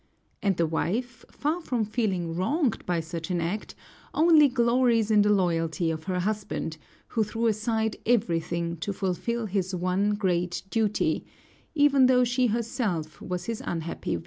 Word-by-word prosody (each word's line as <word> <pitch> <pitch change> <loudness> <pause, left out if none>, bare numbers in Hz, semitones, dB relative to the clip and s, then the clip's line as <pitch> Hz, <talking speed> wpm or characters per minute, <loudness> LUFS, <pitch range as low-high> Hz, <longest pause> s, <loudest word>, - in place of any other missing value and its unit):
And 195 -3 +1
the 170 - +3
wife, 225 +10 -2
far 310 +5 -2
from 245 -8 -1
feeling 190 -7 -1
wronged 265 - 0
by 175 -2 +1
such 165 +1 -6
an 180 -1 0
act, 175 +6 -3 0.4
only 315 -2 +6
glories 235 -3 +2
in 210 -1 +6
the 205 - +3
loyalty 170 -3 +1
of 155 -1 -5
her 185 -1 -1
husband, 205 -5 -3 0.3
who 225 - +1
threw 225 +2 -2
aside 220 0 0
everything 170 -6 0
to 200 +5 -3
fulfill 205 +5 -2
his 190 -2 -1
one 185 +4 +1
great 180 -3 -1
duty, 215 -2 +1 0.5
even 280 -3 +5
though 250 -1 +5
she 245 +1 +2
herself 215 - -2
was 180 -1 -4
his 230 -2 -4
unhappy 165 - -3
victim. - - -3
205 Hz, 155 wpm, -27 LUFS, 175-235 Hz, 0.5 s, only